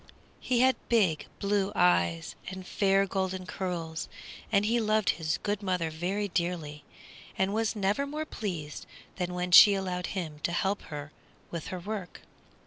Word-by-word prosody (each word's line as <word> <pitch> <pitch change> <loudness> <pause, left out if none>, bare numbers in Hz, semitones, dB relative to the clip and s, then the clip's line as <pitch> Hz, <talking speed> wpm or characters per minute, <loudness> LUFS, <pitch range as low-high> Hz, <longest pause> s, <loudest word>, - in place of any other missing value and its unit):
He 245 -1 +1
had 260 0 +4
big 195 -10 +2
blue 200 0 0
eyes, 85 - +2 0.2
and 185 0 -7
fair 195 +1 +2
golden 190 -1 -2
curls, 170 -4 -4 0.4
and 200 -1 +3
he 235 +2 +2
loved 215 -1 +2
his 160 0 -2
good 205 0 -1
mother 180 -4 -1
very 185 +6 -2
dearly, 170 -5 -2 0.5
and 190 +1 +1
was 225 +1 0
never 205 +7 0
more 305 +2 -3
pleased 170 - -5 0.3
than 180 -1 -2
when 180 0 -2
she 200 +3 +10
allowed 180 -2 -2
him 155 -5 -4
to 170 - -2
help 195 +3 0
her 150 0 -6 0.4
with 170 -2 -5
her 185 -2 -4
work. 195 0 -6
185 Hz, 155 wpm, -29 LUFS, 170-205 Hz, 0.5 s, she